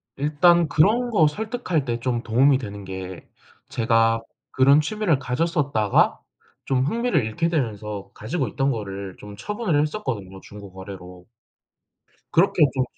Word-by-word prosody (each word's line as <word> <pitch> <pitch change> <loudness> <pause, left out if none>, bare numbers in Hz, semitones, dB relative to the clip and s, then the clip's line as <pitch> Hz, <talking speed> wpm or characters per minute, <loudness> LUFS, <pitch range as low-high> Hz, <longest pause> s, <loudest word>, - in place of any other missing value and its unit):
일단 155 +4 +3
그런 220 +12 +3
거 165 -9 +4
설득할 210 - -2
때 120 -1 -2
좀 120 -1 -2
도움이 130 +4 +4
되는게 95 -5 -7 0.4
제가 115 -1 +2 0.3
그런 140 +3 +5
취미를 185 -4 0
가졌었다가 135 - +1 0.5
좀 130 -1 +1
흥미를 230 - +1
잃게 135 +10 -1
되면서 105 - -3
가지고 130 +4 -3
있던 135 +5 0
거를 100 -4 -5
좀 105 0 -10
처분을 195 - -1
했었거든요 115 - -4
중고거래로. 95 -3 -11 1.1
그렇게 175 0 +3
좀 130 - +1
130 Hz, 285 characters per minute, -23 LUFS, 105-165 Hz, 1.1 s, 그런